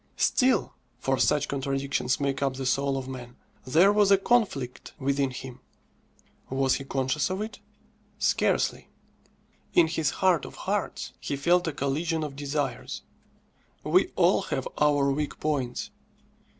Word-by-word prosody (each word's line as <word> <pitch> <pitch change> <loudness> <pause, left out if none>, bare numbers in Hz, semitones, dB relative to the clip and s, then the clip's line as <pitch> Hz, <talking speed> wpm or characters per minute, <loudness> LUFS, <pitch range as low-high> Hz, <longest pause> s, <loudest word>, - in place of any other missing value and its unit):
Still 260 -1 +2 0.2
(for 135 +1 0
such 145 -1 +2
contradictions 135 -2 -1
make 140 -1 -1
up 135 -2 0
the 135 0 -4
soul 135 +2 +1
of 130 -1 -5
man) 125 -2 -8 0.3
there 175 +9 +5
was 205 -1 +4
a 200 - +7
conflict 195 - 0
within 140 0 0
him. 130 0 -8 0.9
Was 135 0 +2
he 135 - -8
conscious 135 +3 0
of 185 +1 -2
it? 215 +1 -5 0.6
Scarcely. - - +1 0.9
In 175 - +7
his 160 -1 0 0.2
heart 180 -5 +4
of - - -9
hearts - - -2
he - - -3
felt 175 +5 +2
a - - 0
collision 155 +4 -1
of 145 -2 -5
desires. 140 -2 -3 0.8
We - - +3
all - - +4
have - - -3
our 145 -2 +3
weak 145 +1 -3
points. 135 -5 -2
140 Hz, 140 wpm, -27 LUFS, 135-160 Hz, 0.9 s, a